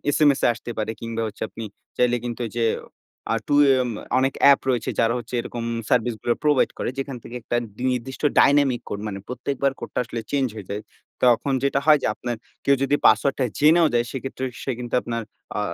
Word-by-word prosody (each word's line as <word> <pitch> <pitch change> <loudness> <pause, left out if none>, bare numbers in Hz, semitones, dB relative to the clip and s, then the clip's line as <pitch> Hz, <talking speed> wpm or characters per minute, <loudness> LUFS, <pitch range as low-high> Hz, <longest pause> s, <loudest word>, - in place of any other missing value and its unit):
SMS 145 -3 +4
এ - - +6
আসতে 120 +1 -8
পারে 110 +1 -1
কিংবা 115 0 -3
হচ্ছে 110 - -6
আপনি 115 - -8 0.3
চাইলে 125 0 +3
কিন্তু 120 0 -4
এইযে 115 +1 -1 0.7
আ - - +2
টু 145 - +2
এ - - +7
এম 120 - -3 0.3
অনেক 135 +1 +1
অ্যাপ 140 -1 +8
রয়েছে 120 -3 0
যারা 115 0 +3
হচ্ছে 120 +1 -9
এরকম 120 0 -6 0.3
সার্ভিস 120 -2 +2
গুলা 120 - +1
প্রোভাইড 145 -3 +3
করে - - -2
যেখান 135 -2 -4
থেকে 120 - -9
একটা 120 - -3 0.4
নির্দিষ্ট 125 +1 -4 0.2
ডাইনামিক 140 -3 +4
কোড 100 - -4
মানে 100 -1 -5
প্রত্যেকবার 135 +2 -1
কোডটা - - -4
আসলে 115 0 -5
চেঞ্জ 140 -2 +2
হয়ে 100 -4 -8
যায়। 105 +1 -3 0.4
তখন 125 +3 +4
যেটা 140 0 +2
হয় 150 -2 +6
যে - - +2
আপনার 120 -1 -4 0.3
কেউ 140 - +5
যদি 140 +2 +2
পাসওয়ার্ডটা 130 +4 +4
জেনেও 160 +2 +6
যায় 120 0 +2
সেক্ষেত্রে 135 0 -4 0.2
সে 135 - -1
কিন্তু 120 -1 -7
আপনার 115 -1 -3 0.4
আ - - 0
125 Hz, 200 wpm, -23 LUFS, 115-140 Hz, 0.7 s, অ্যাপ